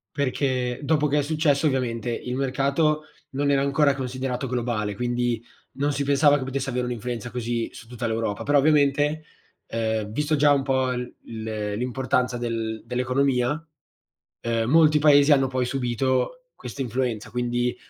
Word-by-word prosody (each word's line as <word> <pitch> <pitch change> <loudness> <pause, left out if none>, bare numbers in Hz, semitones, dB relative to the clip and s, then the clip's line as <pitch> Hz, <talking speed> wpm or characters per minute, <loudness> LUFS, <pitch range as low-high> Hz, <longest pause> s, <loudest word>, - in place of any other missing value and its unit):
Perché 130 -3 -1
dopo 150 0 +2
che 150 +1 +2
è - - +3
successo, 155 0 +1
ovviamente, 120 -4 -1
il 125 +2 -4
mercato 140 +4 +1 0.3
non 140 +1 0
era 135 -1 +3
ancora 140 0 +3
considerato 130 0 -3
globale, 115 -4 -2
quindi 120 0 -1 0.3
non 145 +2 0
si 140 0 -1
pensava 145 +1 +4
che 135 - -4
potesse 135 0 -3
avere 125 0 -1
un'influenza 120 0 -4
così 120 -1 -2
su 115 - -12
tutta 120 0 -4
l'Europa. 110 -2 -2
Però 145 0 +3
ovviamente, 145 +1 +3 0.4
ehm 110 -2 -2
visto 150 +6 0
già 145 0 +4
un 140 -1 +1
po' 130 -1 +1
l 125 0 -4 0.6
l'importanza 125 +1 0
del 115 -2 -3
dell'economia, 125 +3 0 0.8
ehm, 115 0 -1
molti 155 0 +5
paesi 145 0 +6
hanno 135 -2 +5
poi 130 -1 -1
subito 130 - -1
questa 140 - -7
influenza. 120 -3 -2
Quindi, 120 0 -1
130 Hz, 150 wpm, -24 LUFS, 120-140 Hz, 0.8 s, paesi